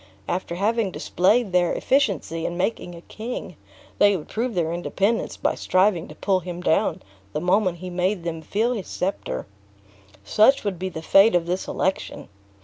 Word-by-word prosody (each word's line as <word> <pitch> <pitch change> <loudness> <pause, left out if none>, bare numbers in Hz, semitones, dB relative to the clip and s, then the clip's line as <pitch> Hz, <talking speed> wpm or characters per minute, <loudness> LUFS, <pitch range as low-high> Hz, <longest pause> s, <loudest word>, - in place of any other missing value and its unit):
After 175 -1 -2
having 215 +2 +1
displayed 195 +4 +1
their 180 -1 +2
efficiency 200 - 0
in 175 - -4
making 180 -2 -2
a 170 - -11
king, 225 +7 -7 0.4
they 205 -1 +5
would 150 - -10
prove 235 0 -2
their 165 -2 0
independence 195 +6 -1
by - - +1
striving 185 -2 +1
to - - -11
pull 195 -2 +1
him 175 0 -7
down 170 -2 +1 0.3
the - - -1
moment 180 +1 +2
he 180 +1 -7
made 180 +1 0
them 165 -1 -4
feel 220 +9 0
his 210 -6 -5
specter. 120 - -3 0.8
"Such 215 - +4
would 195 -5 -3
be 190 +1 -2
the 160 -3 -7
fate 195 +4 +6
of 170 -1 +2
this 180 +2 -2
election. 190 +1 -2
185 Hz, 170 wpm, -24 LUFS, 175-210 Hz, 0.8 s, fate